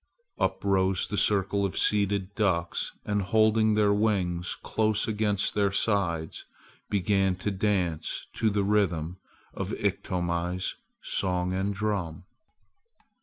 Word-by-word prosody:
Up - - 0
rose 95 -2 +2
the 105 - -4
circle 100 -1 +2
of 95 - -2
seated 100 -1 +1
ducks 90 -6 0
and 105 -1 0
holding 110 +2 +3
their 105 -1 +4
wings 95 -5 0
close 110 -1 +1
against 105 -2 0
their 100 -1 +2
sides 95 -6 0 0.5
began 95 -1 +2
to 95 +3 -3
dance 95 -5 -1
to 110 - +1
the 100 -1 0
rhythm 90 -5 +1 0.4
of - - -4
Iktomi's 90 0 -1 0.3
song 90 -1 0
and 95 +2 0
drum. 100 -6 -2
100 Hz, 120 wpm, -28 LUFS, 90-105 Hz, 0.5 s, their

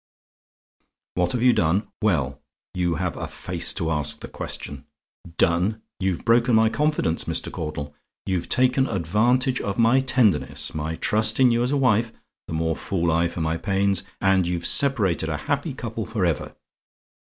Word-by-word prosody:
"WHAT 90 -1 0
HAVE 125 -1 -1
YOU 125 -1 +6
DONE? 90 +4 +1
"Well, 75 -9 0 0.3
you 90 -2 0
have - - -2
a - - -4
face - - -1
to 80 -1 -1
ask 75 -1 0
the - - -6
question. 70 0 -6 0.5
Done? 95 +7 +1 0.2
You've 95 -3 -2
broken 120 +1 +4
my 110 0 +5
confidence, 150 - 0
Mr. - - -2
Caudle: 75 -2 -5 0.3
you've 90 -3 -2
taken 130 +1 +2
advantage 115 +8 +1
of 100 - -3
my 115 +3 +4
tenderness, 125 -6 +1
my 80 +1 -3
trust 110 +6 +1
in 130 -2 +6
you 115 0 +2
as 125 +2 0
a 145 - +2
wife 115 -4 +2 0.4
the - - -6
more 80 0 0
fool 85 -2 -1
I 85 +1 +2
for 85 - -5
my 80 +1 0
pains! 95 0 0 0.2
and 95 -2 +2
you've 85 -1 -2
separated 105 - +2
a 80 - -2
happy - - -1
couple - - -5
for - - -1
ever. - - -2
95 Hz, 165 wpm, -24 LUFS, 80-120 Hz, 0.5 s, YOU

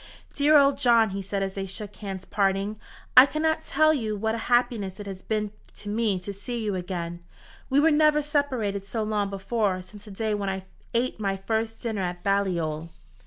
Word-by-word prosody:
"Dear 300 +1 +5
old 280 -1 +4
John," 235 -5 +4
he 195 +1 -3
said, 195 +1 -2
as 195 0 -3
they 195 0 -4
shook 205 +2 -7
hands 195 -3 -6
at - - -22
parting, 200 +1 0 0.4
"I 255 +2 +10
cannot 315 +2 0
tell 310 +2 +3
you 220 -7 -1
what 220 +2 0
a 230 - -2
happiness 240 -6 +1
it 205 - -6
has 190 -2 -7
been 210 -1 -2 0.2
to 205 - -8
me 215 -2 +1
to 200 +2 -5
see 220 +5 -5
you 215 -3 -1
again. 175 -2 -4 0.5
We 270 - +4
were 320 +2 +5
never 300 0 +4
separated 255 -9 0
so 220 +2 -3
long 210 -2 0
before 195 0 -1
since 205 +3 -12
the - - -10
day 215 +2 -2
when 200 -1 -1
I 190 0 -4 0.3
ate 240 0 0
my 195 -2 -1
first 220 +3 -2
dinner 220 -4 -2
at 175 -1 -4
Balliol." 170 -6 0
210 Hz, 205 wpm, -26 LUFS, 195-240 Hz, 0.5 s, I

